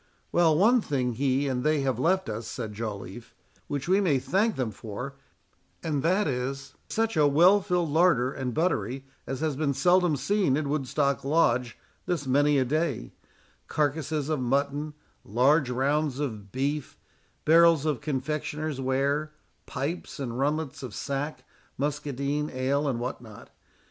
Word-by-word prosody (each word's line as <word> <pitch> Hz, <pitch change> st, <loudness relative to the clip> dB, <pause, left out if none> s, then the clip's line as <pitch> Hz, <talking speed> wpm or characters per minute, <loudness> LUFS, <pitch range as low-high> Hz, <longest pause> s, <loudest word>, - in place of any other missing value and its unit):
"Well, 165 Hz, -3 st, +4 dB
one 230 Hz, +7 st, +5 dB
thing 130 Hz, -, -1 dB
he 135 Hz, +3 st, +1 dB
and 125 Hz, -2 st, -1 dB
they 155 Hz, -1 st, +2 dB
have 130 Hz, -3 st, -1 dB
left 185 Hz, +6 st, +2 dB
us," 110 Hz, +1 st, -4 dB
said 110 Hz, 0 st, -5 dB
Joliffe, 105 Hz, 0 st, -7 dB, 0.3 s
"which 140 Hz, 0 st, -3 dB
we 190 Hz, +3 st, +4 dB
may 160 Hz, -8 st, +3 dB
thank 200 Hz, -, +1 dB
them 125 Hz, -4 st, -2 dB
for; 115 Hz, +6 st, -7 dB, 0.7 s
and 150 Hz, -4 st, -1 dB
that 185 Hz, +6 st, +2 dB
is, 135 Hz, +1 st, -3 dB, 0.2 s
such 225 Hz, -1 st, 0 dB
a 150 Hz, -2 st, +5 dB
well 175 Hz, +8 st, +5 dB
filled 180 Hz, -4 st, 0 dB
larder 155 Hz, -6 st, +3 dB
and 130 Hz, -2 st, -3 dB
buttery 135 Hz, -4 st, -1 dB, 0.2 s
as 135 Hz, +2 st, -4 dB
has 155 Hz, -3 st, 0 dB
been 140 Hz, -1 st, 0 dB
seldom 175 Hz, +2 st, +3 dB
seen 185 Hz, -2 st, +1 dB
in 150 Hz, -2 st, -2 dB
Woodstock 140 Hz, -1 st, 0 dB
Lodge 125 Hz, -5 st, +2 dB, 0.3 s
this 165 Hz, -5 st, -1 dB
many 145 Hz, +2 st, +3 dB
a 130 Hz, -, +2 dB
day: 145 Hz, -, -1 dB, 0.6 s
carcasses 150 Hz, 0 st, -1 dB
of 155 Hz, -2 st, 0 dB
mutton, 140 Hz, +4 st, -1 dB, 0.3 s
large 130 Hz, +5 st, +3 dB
rounds 140 Hz, +2 st, 0 dB
of 110 Hz, -9 st, -4 dB
beef, 140 Hz, +2 st, -2 dB, 0.5 s
barrels 165 Hz, -1 st, +6 dB
of 150 Hz, -6 st, 0 dB
confectioners' 150 Hz, +1 st, -3 dB
ware, 140 Hz, +4 st, 0 dB, 0.3 s
pipes 145 Hz, +5 st, -4 dB
and 125 Hz, -3 st, -4 dB
runlets 150 Hz, 0 st, -1 dB
of 125 Hz, -6 st, -7 dB
sack, 140 Hz, +2 st, -3 dB, 0.3 s
muscadine, 145 Hz, 0 st, -2 dB
ale, 135 Hz, +3 st, 0 dB
and 125 Hz, -4 st, -1 dB
what 125 Hz, +1 st, -4 dB
not. 110 Hz, -4 st, -13 dB
140 Hz, 150 wpm, -27 LUFS, 130-155 Hz, 0.7 s, barrels